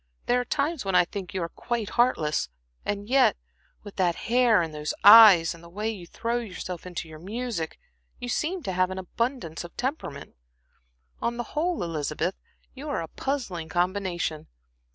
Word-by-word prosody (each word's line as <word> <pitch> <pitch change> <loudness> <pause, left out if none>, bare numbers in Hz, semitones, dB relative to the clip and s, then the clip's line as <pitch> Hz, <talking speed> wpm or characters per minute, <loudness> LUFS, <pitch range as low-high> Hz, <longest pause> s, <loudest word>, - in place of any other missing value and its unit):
There 245 +1 +3
are - - -6
times 305 +2 -1
when 195 -2 -1
I 180 -1 +6
think 190 -1 -6
you 185 - -1
are 170 - -3
quite 235 0 -3
heartless, 160 - +1 0.3
and 205 0 -3
yet 265 - +4 0.5
with 205 -1 -11
that 175 -3 +2
hair, 240 -2 +3
and 160 -2 -5
those 150 0 -3
eyes, 205 -6 +9
and 170 0 -14
the 170 - -12
way 210 +5 -2
you 185 -6 -9
throw 230 +7 -2
yourself 185 -6 -6
into 175 -2 -5
your 155 -1 -11
music, 210 -2 -4 0.4
you 245 - -6
seem 325 +8 -1
to 190 - -2
have 185 0 +1
abundance 190 - -3
of 175 - -12
temperament. 250 - -4 0.9
On 235 0 -1
the 240 - -2
whole, 335 - 0
Elizabeth, 160 +2 -2 0.4
you 280 +3 -7
are 275 - -1
a - - -6
puzzling 215 - -3
combination. 175 -3 -1
195 Hz, 175 wpm, -26 LUFS, 170-245 Hz, 0.9 s, eyes